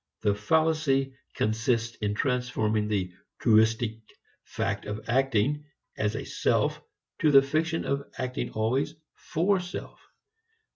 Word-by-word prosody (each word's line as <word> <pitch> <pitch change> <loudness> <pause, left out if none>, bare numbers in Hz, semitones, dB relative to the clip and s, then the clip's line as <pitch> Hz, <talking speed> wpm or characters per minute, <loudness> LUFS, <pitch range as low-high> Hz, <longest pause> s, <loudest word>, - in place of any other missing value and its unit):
The 105 - +3
fallacy 135 +3 +1 0.2
consists 115 +1 0
in 105 -1 -1
transforming 110 -4 0
the 95 -4 -1 0.3
(truistic) 110 0 +3 0.4
fact - - -3
of 105 +1 -5
acting 135 +3 +1 0.3
as 105 0 -1
a - - -4
self - - 0 0.4
into 155 - +4
the 135 -1 +7
fiction 165 +3 0
of 140 +1 -2
acting 130 0 -3
always 130 +8 0 0.2
for 185 +5 0
self. 180 0 -7
125 Hz, 115 wpm, -28 LUFS, 110-145 Hz, 0.4 s, the